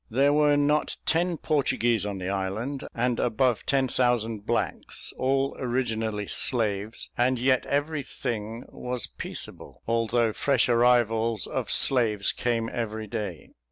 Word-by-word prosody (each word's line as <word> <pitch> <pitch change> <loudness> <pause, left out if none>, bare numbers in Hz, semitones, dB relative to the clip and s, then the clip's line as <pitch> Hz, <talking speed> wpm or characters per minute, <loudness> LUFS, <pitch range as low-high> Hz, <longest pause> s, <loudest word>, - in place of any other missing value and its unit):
There 140 +5 +3
were 150 -1 +4
not 145 +1 +1
ten 170 +1 +1
Portuguese 120 -8 +1
on 100 -1 -4
the 90 -1 -5
island, 100 +8 -3
and 120 0 0
above 120 0 +1
ten 135 -1 +2
thousand 115 -4 0
blacks, 120 - -1
all 135 +1 0
originally 115 -4 -1
slaves; 110 -2 -1
and 125 +1 +2
yet 130 +1 +2
every 145 +1 0
thing 115 -2 -4
was 125 -2 -3
peaceable, - - -8
although 115 0 +1
fresh 135 0 +2
arrivals 115 -3 +3
of - - -3
slaves 110 -6 +3
came 115 -2 -1
every 110 -2 -4
day. 105 -6 -5
120 Hz, 130 wpm, -26 LUFS, 110-130 Hz, -, were